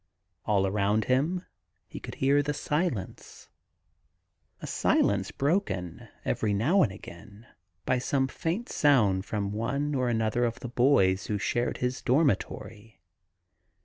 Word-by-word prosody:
All 100 Hz, -2 st, +2 dB
around 105 Hz, +2 st, +1 dB
him 155 Hz, +8 st, 0 dB, 0.4 s
he -, -, -9 dB
could -, -, -8 dB
hear 140 Hz, +2 st, +3 dB
the 145 Hz, +1 st, -2 dB
silence 150 Hz, -, -3 dB, 0.6 s
— -, -, -48 dB
a -, -, -7 dB
silence 100 Hz, -2 st, +1 dB
broken 105 Hz, -, -2 dB, 0.2 s
every 105 Hz, -2 st, 0 dB
now 155 Hz, -, +3 dB
and 100 Hz, -, +2 dB
again 100 Hz, +3 st, -12 dB, 0.4 s
by 130 Hz, -, +1 dB
some 135 Hz, +1 st, 0 dB
faint 170 Hz, -, -3 dB
sound 105 Hz, -10 st, +3 dB
from 100 Hz, -2 st, -2 dB
one 140 Hz, +7 st, -2 dB
or 130 Hz, -3 st, 0 dB
anotiier 115 Hz, +1 st, +1 dB
of 115 Hz, -, -5 dB
the 125 Hz, -, -5 dB
boys 115 Hz, -7 st, +3 dB
who 105 Hz, -, -1 dB
shared 120 Hz, +4 st, -1 dB
his 125 Hz, 0 st, -2 dB
dormitory. 115 Hz, -, -1 dB
120 Hz, 135 wpm, -28 LUFS, 100-140 Hz, 0.6 s, hear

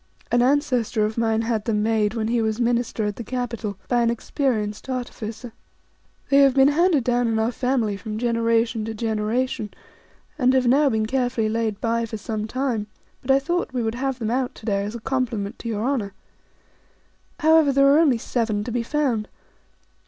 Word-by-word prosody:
An 240 Hz, -, +3 dB
ancestor 250 Hz, -5 st, +1 dB
of 215 Hz, +1 st, -3 dB
mine 225 Hz, -1 st, +1 dB
had 225 Hz, -2 st, -1 dB
them 210 Hz, -2 st, 0 dB
made, 220 Hz, -1 st, +1 dB
when 220 Hz, -1 st, -1 dB
he 235 Hz, 0 st, +1 dB
was 220 Hz, -1 st, 0 dB
a 245 Hz, -, 0 dB
minister 235 Hz, -2 st, 0 dB
at 205 Hz, -1 st, -3 dB
the 235 Hz, -, -5 dB
capital, 235 Hz, -4 st, -4 dB
by 245 Hz, -1 st, +2 dB
an 235 Hz, -, +2 dB
experienced 235 Hz, -2 st, -2 dB
artificer. 245 Hz, -2 st, -5 dB, 0.8 s
They 275 Hz, -, +6 dB
have 275 Hz, -2 st, +5 dB
been 270 Hz, 0 st, +6 dB
handed 320 Hz, -2 st, +3 dB
down 245 Hz, 0 st, +1 dB
in 225 Hz, -1 st, 0 dB
our 220 Hz, +2 st, +1 dB
family 245 Hz, -4 st, 0 dB
from 215 Hz, +1 st, -6 dB
generation 230 Hz, -1 st, +1 dB
to 225 Hz, 0 st, -5 dB
generation, 220 Hz, +1 st, -1 dB, 0.7 s
and 255 Hz, 0 st, +3 dB
have 260 Hz, -1 st, +3 dB
now 275 Hz, +4 st, +4 dB
been 220 Hz, -3 st, 0 dB
carefully 245 Hz, -2 st, 0 dB
laid 220 Hz, -2 st, -1 dB
by 230 Hz, 0 st, 0 dB
for 220 Hz, -, -5 dB
some 215 Hz, 0 st, -4 dB
time; 245 Hz, -4 st, -2 dB, 0.3 s
but 255 Hz, -, -13 dB
I 270 Hz, -, +6 dB
thought 330 Hz, +1 st, -2 dB
we 245 Hz, -2 st, -1 dB
would 220 Hz, 0 st, -1 dB
have 265 Hz, +1 st, -2 dB
them 225 Hz, -3 st, -2 dB
out 255 Hz, 0 st, -1 dB
to -, -, -13 dB
day 200 Hz, -2 st, 0 dB
as 210 Hz, +3 st, -5 dB
a -, -, -5 dB
compliment 235 Hz, -5 st, -2 dB
to 230 Hz, -, -5 dB
your 215 Hz, -1 st, -2 dB
Honour. 240 Hz, -7 st, -1 dB, 1.3 s
However, 315 Hz, -2 st, +5 dB
there 275 Hz, 0 st, +4 dB
are 280 Hz, +2 st, +6 dB
only 290 Hz, -7 st, +4 dB
seven 225 Hz, -3 st, -1 dB
to 235 Hz, -, -5 dB
be 240 Hz, +1 st, 0 dB
found. 240 Hz, -4 st, -1 dB
235 Hz, 195 wpm, -23 LUFS, 220-260 Hz, 1.3 s, They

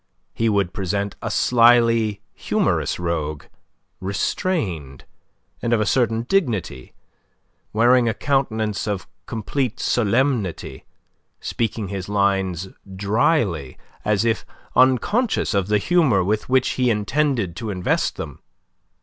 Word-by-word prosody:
He 115 Hz, 0 st, +1 dB
would 100 Hz, -4 st, +1 dB
present 100 Hz, +1 st, -2 dB
a -, -, -3 dB
slyly 115 Hz, -3 st, +4 dB
humorous -, -, 0 dB
rogue, 80 Hz, -4 st, -3 dB, 0.6 s
restrained, 95 Hz, -, -2 dB, 0.6 s
and 120 Hz, -, 0 dB
of 115 Hz, -, +3 dB
a 105 Hz, -, +1 dB
certain 115 Hz, 0 st, +1 dB
dignity, 120 Hz, -, -1 dB, 0.8 s
wearing 120 Hz, +2 st, +4 dB
a 110 Hz, -, -2 dB
countenance 110 Hz, -8 st, -1 dB
of 100 Hz, -3 st, -3 dB, 0.2 s
complete 120 Hz, +2 st, -2 dB
solemnity, 120 Hz, -, 0 dB, 0.5 s
speaking 110 Hz, -3 st, -3 dB
his 95 Hz, -1 st, -5 dB
lines 95 Hz, -3 st, 0 dB, 0.3 s
drily, 100 Hz, -, 0 dB, 0.3 s
as 105 Hz, 0 st, +1 dB
if 115 Hz, -1 st, +1 dB, 0.3 s
unconscious 130 Hz, -, +2 dB
of 100 Hz, -2 st, +1 dB
the 105 Hz, 0 st, +3 dB
humour 135 Hz, -, +3 dB
with 105 Hz, +5 st, -1 dB
which 130 Hz, 0 st, +3 dB
he 125 Hz, -1 st, +1 dB
intended 115 Hz, -, 0 dB
to 115 Hz, -2 st, -4 dB
invest 90 Hz, -3 st, 0 dB
them. -, -, -7 dB
110 Hz, 115 wpm, -22 LUFS, 95-120 Hz, 0.8 s, slyly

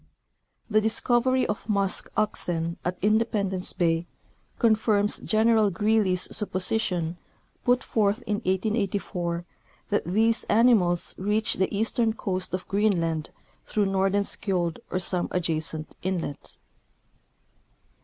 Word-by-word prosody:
The 215 Hz, -1 st, +3 dB
discovery 240 Hz, +3 st, +2 dB
of 210 Hz, +1 st, -4 dB
musk 200 Hz, -2 st, 0 dB
oxen 170 Hz, -5 st, 0 dB
at 180 Hz, +1 st, -2 dB
Independence 210 Hz, -3 st, +1 dB
bay 165 Hz, -1 st, 0 dB, 0.5 s
confirms 215 Hz, -3 st, +2 dB
General 220 Hz, -1 st, +3 dB
Greely's 205 Hz, -2 st, +2 dB
supposi 200 Hz, +1 st, -1 dB
tion, 170 Hz, -4 st, -2 dB, 0.5 s
put 245 Hz, +1 st, +2 dB
forth 215 Hz, +2 st, 0 dB
in 210 Hz, -, -1 dB
1884, 190 Hz, -3 st, -2 dB, 0.4 s
that 205 Hz, -, 0 dB
these 220 Hz, +6 st, +2 dB
animals 210 Hz, -6 st, +3 dB
reach 210 Hz, +3 st, +1 dB
the 190 Hz, -, -1 dB
eastern 225 Hz, +1 st, +1 dB
coast 185 Hz, -4 st, -3 dB
of 185 Hz, -, -7 dB
Greenland 170 Hz, -6 st, 0 dB, 0.4 s
through 210 Hz, -1 st, +1 dB
Nordenskiold 195 Hz, -2 st, 0 dB
or -, -, -2 dB
some 180 Hz, -1 st, 0 dB
adjacent 160 Hz, -3 st, -2 dB
inlet. 175 Hz, -6 st, -4 dB
200 Hz, 105 wpm, -26 LUFS, 180-220 Hz, 0.5 s, The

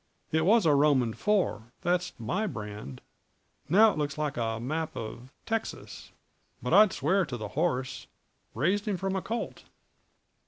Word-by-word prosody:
It 160 Hz, +2 st, +2 dB
was 225 Hz, -1 st, +5 dB
a 155 Hz, -, +5 dB
Roman 140 Hz, -5 st, +3 dB
four 175 Hz, -, 0 dB
that's 180 Hz, 0 st, 0 dB
my 185 Hz, -, -1 dB
brand; 105 Hz, -, -7 dB, 0.7 s
now 215 Hz, +6 st, +7 dB
it -, -, -5 dB
looks 145 Hz, -1 st, -2 dB
like 150 Hz, -2 st, -2 dB
a 115 Hz, -1 st, -2 dB
map 155 Hz, +7 st, -3 dB
of 115 Hz, +3 st, -7 dB, 0.2 s
Texas; 225 Hz, 0 st, -4 dB, 0.5 s
but -, -, -2 dB
I'd 210 Hz, -1 st, +7 dB
swear 185 Hz, +7 st, +1 dB
to 135 Hz, -7 st, -5 dB
the 105 Hz, -2 st, -6 dB
horse 135 Hz, -, -1 dB, 0.5 s
raised 185 Hz, -, +1 dB
him 200 Hz, -3 st, 0 dB
from 195 Hz, +1 st, -2 dB
a 190 Hz, -, -1 dB
colt." 230 Hz, +5 st, -5 dB
155 Hz, 155 wpm, -29 LUFS, 120-195 Hz, 0.7 s, now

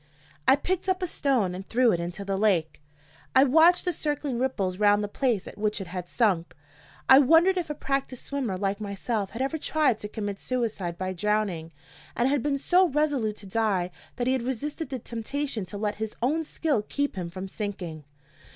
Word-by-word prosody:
I 265 Hz, -, +8 dB
picked 365 Hz, +6 st, -2 dB
up 370 Hz, 0 st, 0 dB
a -, -, +3 dB
stone 260 Hz, -, +1 dB
and 185 Hz, +2 st, -6 dB
threw 245 Hz, 0 st, +4 dB
it 175 Hz, -, 0 dB
into 175 Hz, +4 st, -5 dB
the 195 Hz, 0 st, -1 dB
lake. 190 Hz, -8 st, +1 dB, 0.5 s
I 260 Hz, -, +8 dB
watched 320 Hz, +6 st, +5 dB
the 355 Hz, -, +1 dB
circling 290 Hz, -5 st, -2 dB
ripples 200 Hz, -8 st, -1 dB
round 205 Hz, 0 st, +4 dB
the -, -, -1 dB
place 225 Hz, -2 st, 0 dB
at -, -, -10 dB
which 210 Hz, 0 st, 0 dB
it 195 Hz, -, -5 dB
had 180 Hz, 0 st, -6 dB
sunk. 190 Hz, -9 st, +1 dB, 0.5 s
I 265 Hz, -, +9 dB
wondered 325 Hz, +7 st, +5 dB
if 350 Hz, -4 st, -2 dB
a 300 Hz, -, -3 dB
practiced 275 Hz, -3 st, -3 dB
swimmer 255 Hz, -9 st, -2 dB
like 200 Hz, +2 st, -1 dB
myself 200 Hz, 0 st, -2 dB
had 230 Hz, +4 st, -3 dB
ever 315 Hz, +4 st, -2 dB
tried 290 Hz, -8 st, +1 dB
to 210 Hz, -, -5 dB
commit 205 Hz, -2 st, -5 dB
suicide 220 Hz, -9 st, -2 dB
by 185 Hz, +1 st, -3 dB
drowning, 190 Hz, -4 st, -1 dB, 0.4 s
and 240 Hz, -, +2 dB
had 280 Hz, -1 st, +1 dB
been 285 Hz, +1 st, 0 dB
so 360 Hz, +6 st, +4 dB
resolute 280 Hz, -8 st, 0 dB
to 210 Hz, -, -10 dB
die 195 Hz, -3 st, 0 dB, 0.2 s
that 245 Hz, -, -2 dB
he 255 Hz, -, +2 dB
had 260 Hz, -, 0 dB
resisted 265 Hz, +5 st, -3 dB
the 265 Hz, -, -3 dB
temptation 235 Hz, 0 st, -4 dB
to 195 Hz, +3 st, -7 dB
let 210 Hz, 0 st, -2 dB
his 220 Hz, -1 st, -3 dB
own 305 Hz, +7 st, +1 dB
skill 300 Hz, -6 st, 0 dB
keep 285 Hz, +5 st, -2 dB
him 180 Hz, -3 st, -4 dB
from 185 Hz, +3 st, -6 dB
sinking. 185 Hz, -6 st, -5 dB
225 Hz, 200 wpm, -27 LUFS, 195-280 Hz, 0.5 s, I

